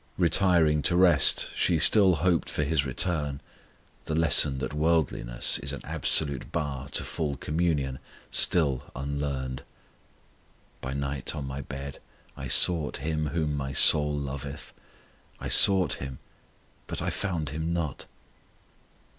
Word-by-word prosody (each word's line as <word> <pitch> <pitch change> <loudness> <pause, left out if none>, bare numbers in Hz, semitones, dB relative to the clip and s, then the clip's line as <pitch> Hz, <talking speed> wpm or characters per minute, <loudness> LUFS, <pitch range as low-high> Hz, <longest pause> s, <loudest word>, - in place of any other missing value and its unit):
Retiring 85 -3 +2
to 85 - +2
rest 85 -6 +4
she 85 - +1
still 95 +2 +5
hoped 85 +1 0
for 75 - -2
His 70 -1 -1
return 75 0 -2 0.7
the 80 - -3
lesson 75 -4 +4
that 65 +3 -5
worldliness 75 -6 0
is 70 0 -5
an 70 - -7
absolute 70 -4 -1
bar 70 -2 -4
to - - +4
full 75 -4 -4
communion 75 -5 -2 0.3
still 70 -7 +2
unlearned. 70 -1 -4 1.2
By 65 - -5
night 70 0 -4
on 75 -3 -5
my 65 +1 -6
bed 70 +1 -8 0.4
I - - -7
sought 80 -4 +2
Him 75 -1 -2
whom 75 -1 -2
my 70 -1 -4
soul 75 +1 +4
loveth: 70 +1 -7 0.7
I - - -6
sought 95 -2 +6
Him, 65 -1 -7 0.7
but - - -5
I - - -2
found 85 -7 -3
Him 80 +3 -4
not! 80 -5 -4
75 Hz, 130 wpm, -26 LUFS, 70-80 Hz, 1.2 s, sought